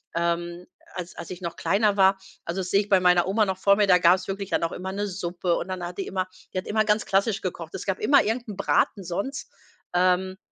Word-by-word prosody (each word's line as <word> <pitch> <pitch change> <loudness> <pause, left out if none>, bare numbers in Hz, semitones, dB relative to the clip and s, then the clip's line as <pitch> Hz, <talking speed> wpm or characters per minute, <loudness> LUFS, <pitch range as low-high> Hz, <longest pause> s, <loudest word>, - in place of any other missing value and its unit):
ähm, 170 +1 -2 0.3
als 180 -1 -6
als 170 - -8
ich 180 0 -8
noch 170 -1 -5
kleiner 205 0 +1
war. 190 0 +4 0.3
Also 175 +3 -3
das 180 - -5
sehe 200 - +4
ich 205 - -9
bei 190 -2 +5
meiner 180 -1 +4
Oma 210 +2 +2
noch 190 -1 -2
vor 200 +1 +4
mir, 205 -1 +3
da 180 -1 +6
gab's 180 +2 +3
wirklich 195 0 -4
dann - - +1
auch 165 - -1
immer 190 +1 -5
'ne 205 +1 -2
Suppe 175 -2 -2
und 185 - -4
dann 185 -1 -4
hat 175 +2 -8
die 195 - -3
immer 185 -1 -2 0.3
die - - -4
hat - - -9
immer 215 0 +1
ganz 210 0 +1
klassisch 200 +2 +1
gekocht. 170 -3 -5
Es - - -6
gab 190 -2 -1
immer 280 +7 +5
irgend 235 +2 -2
'n 200 - -7
Braten 200 0 +1
sonst, 200 +10 -4 0.4
ähm, 185 +1 +2
190 Hz, 250 wpm, -25 LUFS, 180-200 Hz, 0.4 s, da